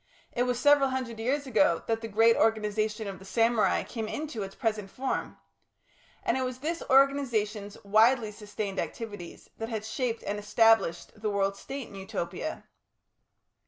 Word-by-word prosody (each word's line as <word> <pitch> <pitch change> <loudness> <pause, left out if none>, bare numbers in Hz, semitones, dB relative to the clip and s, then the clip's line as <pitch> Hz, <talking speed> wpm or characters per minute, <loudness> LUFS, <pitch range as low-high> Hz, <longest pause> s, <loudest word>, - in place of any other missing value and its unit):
It 245 +1 0
was 245 - +1
several 290 0 +5
hundred 255 -4 -4
years 275 +5 0
ago 205 -9 +3
that 225 0 -1
the 225 - -4
great 225 +2 +4
organisation 215 -1 +1
of 195 -1 -6
the - - -13
samurai 230 +2 +2
came 225 -3 -5
into 290 -3 -4
its 195 0 -6
present 215 -4 -2
form. 260 +6 -3 0.9
And - - +1
it - - -1
was 255 -1 -2
this 325 +5 -3
organisation's 235 -7 +2
widely 220 +3 +4
sustained 205 -2 -5
activities 205 -7 -6
that 225 0 -3
had 220 -2 -3
shaped 235 0 -2
and 205 +1 -3
established 210 -2 +2
the 215 - 0
World 200 -1 0
State 270 +5 -7
in - - -14
Utopia. 195 - -5
225 Hz, 160 wpm, -29 LUFS, 205-250 Hz, 0.9 s, several